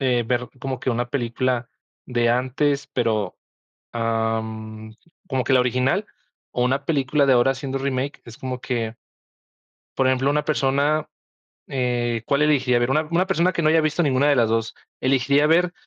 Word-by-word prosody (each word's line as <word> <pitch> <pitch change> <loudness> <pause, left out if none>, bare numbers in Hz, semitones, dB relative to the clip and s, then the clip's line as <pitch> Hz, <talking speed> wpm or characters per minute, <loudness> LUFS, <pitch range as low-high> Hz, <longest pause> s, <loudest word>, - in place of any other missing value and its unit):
eh, 125 -3 +1
ver 125 0 -1
como 130 0 -3
que - - -1
una 120 0 -1
película 125 -1 -1 0.4
de 120 -2 +1
antes, 135 +4 0
pero, 110 -6 -1 0.6
am, 110 -1 -3 0.3
¿como 130 -2 -1
que - - 0
la 130 - +6
original? 125 - +1 0.4
O 125 - 0
una 135 +2 0
película 140 -1 +1
de 135 - +5
ahora, 125 +2 +4
haciendo 135 0 -4
remake. 135 +1 -2
Es 115 -1 -11
como 130 -1 -4
que 115 -4 -3 1.0
Por 135 - +1
ejemplo, 130 +1 +2
una 150 +1 +1
persona, 145 +1 +1 0.6
eh, 120 -3 -1
¿cuál 140 +1 +2
elegiría 135 -5 +3
ver? 120 +1 0
Una 155 +3 +3
una 175 +3 +2
persona, 185 -1 +2
que 170 - -2
no 155 - +3
haya 160 0 +4
visto 155 +2 0
ninguna 140 -1 +2
de 145 - +4
las 115 -2 +3
dos, 115 0 -1 0.3
¿elegiría 135 +3 +3
ver 175 +3 +3
130 Hz, 170 wpm, -23 LUFS, 120-140 Hz, 1.0 s, la